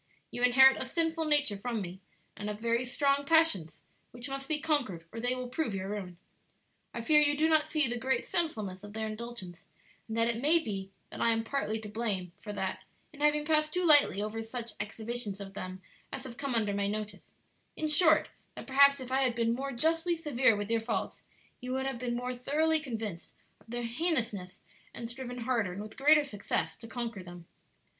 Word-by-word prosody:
You 245 - -5
inherit 265 +2 +7
a - - -1
sinful 325 +3 0
nature 290 -9 +2
from 235 +1 -2
me, 185 -1 -6 0.4
and 205 +1 -5
have 210 0 -5
very 235 +2 +1
strong 280 +3 +1
passions 280 - +2 0.3
which 245 +1 -7
must 275 0 -5
be 305 0 0
conquered 285 - 0
or 230 - -6
they 245 +2 +1
will 255 0 -4
prove 250 -4 -2
your 190 0 -4
ruin. 190 -4 -5 0.7
I 235 - -5
fear 300 +5 +5
you 290 -1 +3
do 315 +2 +3
not 315 -1 +3
see 305 -3 +2
the 240 0 -2
great 260 -1 0
sinfulness 215 - -2
of 205 0 -10
their 220 0 -2
indulgence, 215 -5 -7 0.4
and 225 0 -4
that 230 0 +3
it 235 0 -1
may 305 +5 +5
be 195 -11 -4 0.2
that - - -6
I - - +4
am 225 0 0
partly 225 -3 -2
to 215 - -7
blame 205 -5 -2
for 210 - -6
that 190 -2 -3 0.3
in 290 - -14
having 295 0 +3
passed 305 0 +2
too 360 0 +1
lightly 290 - +6
over 215 +1 -3
such 230 +1 -5
exhibitions 215 -1 -3
of 195 -1 -8
them 185 -1 -7 0.3
as - - -4
have 255 -3 -8
come 275 -1 -2
under 210 -3 +1
my 200 0 0
notice: 210 -1 -5 0.4
in 310 - -1
short, 315 +1 +4 0.3
that - - -8
perhaps 280 +1 +6
if 255 -1 -8
I 265 +1 +2
had 250 -3 +2
been 230 -1 +1
more 275 +3 -3
justly 325 +6 +1
severe 265 -7 +3
with 205 +1 -4
your 230 -1 +2
faults 225 - -3 0.4
you 255 +1 -4
would 265 0 -1
have 270 -3 -3
been 240 -1 -2
more 250 +1 -3
thoroughly 310 +6 +2
convinced 225 - -6 0.2
of - - -25
their 240 +1 -3
heinousness 230 - -1 0.3
and 235 - -5
striven 245 0 -7
harder 230 -6 0
and 195 - -6
with 215 - -10
greater 300 +2 +5
success 210 -8 -2
to 230 - -10
conquer 230 -3 -4
them. 175 -1 -11
240 Hz, 210 wpm, -31 LUFS, 210-285 Hz, 0.7 s, inherit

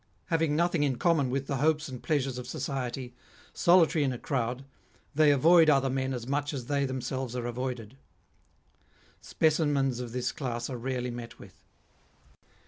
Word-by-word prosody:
Having 165 -3 +1
nothing 170 0 +1
in 140 -3 +1
common 160 -5 +2
with 135 +1 -2
the 140 0 -2
hopes 155 +2 +1
and 130 -3 -8
pleasures 135 -5 -1
of 125 - -8
society, 125 -1 -4 0.4
solitary 170 -3 +4
in 135 - +1
a 125 - -4
crowd, 125 0 -2 0.5
they 150 +1 +5
avoid 160 +4 +6
other 135 -2 +3
men 130 0 -1
as 125 -3 -4
much 145 +2 -2
as 125 -3 -5
they 140 +1 0
themselves 130 -1 -4
are 120 -1 -3
avoided. 120 -1 -5 1.2
Specimens 145 -5 +1
of 125 -2 -5
this 125 +1 -2
class 120 -2 -4
are 125 - -4
rarely 125 0 -3
met 120 -1 -8
with. - - -14
135 Hz, 160 wpm, -29 LUFS, 125-145 Hz, 1.2 s, avoid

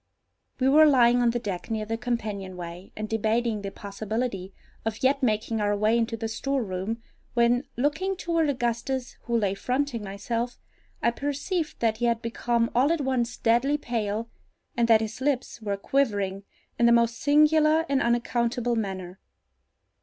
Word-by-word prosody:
We 260 - +2
were 305 +3 +7
lying 245 -3 +5
on 240 - +4
the 235 - 0
deck 200 -6 -5
near 220 -1 -2
the 225 +1 -2
companion 210 -6 -3
way, 175 +2 -8
and 215 0 -4
debating 220 0 0
the 200 - -4
possibility 200 0 -4 0.3
of 225 +1 -4
yet 275 +2 +3
making 225 -2 0
our 205 0 +1
way 215 +2 +3
into 230 0 0
the 225 0 -3
storeroom, 225 -3 -2 0.3
when, 240 +3 +3
looking 305 +9 0
toward 335 -3 +1
Augustus, 245 0 -2
who 235 -1 +1
lay 200 -4 +1
fronting 250 +2 -2
myself, 230 +5 -3 0.5
I 235 - +4
perceived 290 +5 -3
that 225 -2 +2
he 240 - -1
had 235 0 +1
become 230 0 0
all 260 +6 +3
at 335 -3 +1
once 255 -3 -1
deadly 245 +6 +2
pale, 225 -4 -2 0.5
and 235 -1 +2
that 225 -1 +6
his 220 +3 -5
lips 265 -4 -1
were 200 -2 -2
quivering 200 -5 0 0.3
in 235 - +5
the - - +5
most 235 0 +3
singular 305 +2 +4
and 275 -1 +1
unaccountable 240 0 0
manner. 190 -4 -4
235 Hz, 160 wpm, -26 LUFS, 215-260 Hz, 0.5 s, were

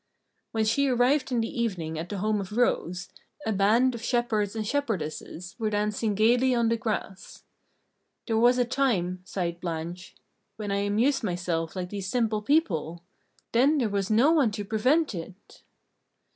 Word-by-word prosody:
When 220 -1 0
she 275 +6 +2
arrived 260 +2 +2
in 240 -2 +1
the 230 +1 -3
evening 165 -8 -2
at 165 - -6
the 205 - -4
home 210 +1 0
of 195 +1 -8
Rose, 180 -6 0 0.4
a 220 - 0
band 220 +6 +3
of 235 - -6
shepherds 225 -4 0
and 220 -1 -2
shepherdesses 185 - -3
were 220 -1 0
dancing 210 0 -1
gaily 245 +4 +3
on 235 -1 +2
the 230 - +2
grass. 215 -4 -5 0.8
"There 225 -2 +1
was 245 +2 +5
a 245 - +3
time," 215 -9 0
sighed 175 -3 -3
Blanche, 170 +1 -5 0.4
"when 210 -2 -4
I 200 - +1
amused 225 +7 +1
myself 175 -4 -2
like 180 -1 -4
these 195 -2 -4
simple 220 -2 0
people! 175 - 0 0.5
Then 275 +6 +4
there 240 -6 +1
was 200 -1 -1
no 235 +8 +4
one 295 -8 +4
to 205 -1 -4
prevent 255 +8 +2
it!" 180 +2 -10
215 Hz, 165 wpm, -27 LUFS, 185-240 Hz, 0.8 s, was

